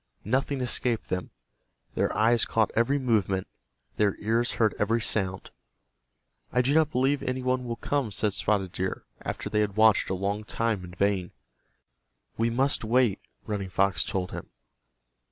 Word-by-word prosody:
Nothing 135 +4 0
escaped 120 -2 0
them. 90 0 -3 0.6
Their - - 0
eyes 115 +2 +4
caught 110 -1 +1
every 120 +5 +2
movement, 105 -8 +1 0.5
their 105 -2 +2
ears 115 +3 0
heard 110 -2 +2
every 115 +3 +2
sound. 95 -4 -1 1.0
"I 125 0 +2
do 135 +3 +2
not 160 -1 +4
believe 135 0 +1
any 130 0 -3
one 130 0 0
will 120 -1 -3
come," 140 0 -1
said 105 0 +1
Spotted 100 -4 0
Deer, 95 +1 -3 0.2
after - - -4
they 105 - 0
had 105 -2 0
watched 110 -1 +5
a 95 - 0
long 100 +3 -2
time 110 -2 -1
in 90 0 -10
vain. 95 -2 0 1.0
"We 115 +1 +1
must 130 +3 +2
wait," 115 -2 +2 0.3
Running 100 -3 -3
Fox 100 +1 +2
told 95 -4 -3
him. - - -7
110 Hz, 155 wpm, -27 LUFS, 100-125 Hz, 1.0 s, watched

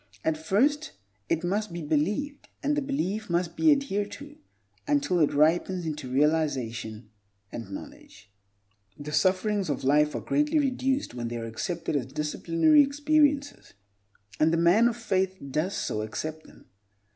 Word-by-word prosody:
At 160 - +2
first 210 - +1 0.4
it 165 +1 0
must 205 +3 -1
be 170 -1 -5
believed, 205 - -1
and 295 +1 +1
the 295 - 0
belief 220 -7 -2
must 170 0 -1
be 315 - +4
adhered 205 -8 0
to, 290 +1 -10 0.5
until 285 -11 +1
it 150 - +3
ripens 165 +4 +2
into 150 -4 -5
realization 130 -7 -1 0.4
and 115 -5 -7
knowledge. 100 +1 -11 0.7
The 150 +1 -7
sufferings 185 +5 +1
of 145 - -2
life 150 +2 +3
are - - -1
greatly 295 +2 +1
reduced 265 - 0
when 120 -1 -4
they 120 0 -4
are 115 - -5
accepted 165 +9 -3
as 130 -4 -1
disciplinary 165 - +3
experiences, 290 - +1 0.6
and 155 +1 +4
the 165 - +2
man 175 +8 +5
of 240 -1 -2
faith 190 -4 -1
does 165 +8 -1
so 105 - -2
accept 155 +9 -5
them. - - -18
175 Hz, 150 wpm, -27 LUFS, -, 0.7 s, man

